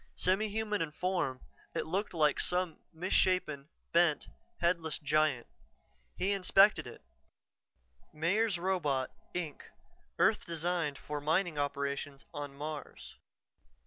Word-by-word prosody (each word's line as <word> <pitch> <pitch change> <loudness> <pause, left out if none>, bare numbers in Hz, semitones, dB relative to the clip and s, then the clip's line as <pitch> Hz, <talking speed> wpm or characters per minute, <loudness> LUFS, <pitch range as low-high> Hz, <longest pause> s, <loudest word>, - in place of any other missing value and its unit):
Semi 190 +4 +2
human 210 -1 -1
in 160 -2 -2
form, 170 -6 -1 0.3
it - - -1
looked 195 +6 -1
like 150 -3 +3
some 180 -2 0
misshapen, 165 -4 +1 0.2
bent, 170 -3 +3 0.3
headless 170 -3 +1
giant. 150 -3 +1 0.7
He 195 - +1
inspected 195 +1 +5
it: - - -11 1.1
Meyers 185 +6 +1
Robot, 160 -8 0 0.2
Inc. 165 -5 -3 0.6
Earth - - +3
designed 165 -3 -1
for 150 -1 -5
mining 160 +1 +1
operations 140 -1 -2
on 145 -2 -6
Mars. 150 +1 -7
165 Hz, 110 wpm, -32 LUFS, 145-185 Hz, 1.1 s, inspected